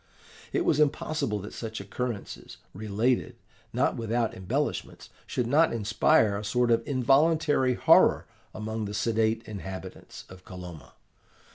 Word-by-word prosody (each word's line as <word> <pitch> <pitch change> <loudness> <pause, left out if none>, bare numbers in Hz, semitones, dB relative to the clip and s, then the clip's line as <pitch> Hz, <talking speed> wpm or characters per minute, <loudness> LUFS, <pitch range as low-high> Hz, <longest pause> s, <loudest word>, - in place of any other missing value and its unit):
It - - 0
was - - +2
impossible 145 -5 0
that 105 - -9
such 110 -1 -6
occurrences, 105 +2 -6 0.2
related, 110 +5 -1 0.4
not - - 0
without 115 0 -1
embellishments, 95 -1 -3 0.2
should 125 - -1
not 150 +7 +3
inspire 110 -2 +2
a - - -7
sort 120 +3 +1
of 115 0 +3
involuntary 140 0 +3
horror - - +5 0.3
amongst 110 0 -4
the 100 - -5
sedate 110 +1 0
inhabitants 95 -2 -8
of 95 0 -14
Kolomna. 90 - -10
110 Hz, 125 wpm, -27 LUFS, 100-125 Hz, 0.4 s, horror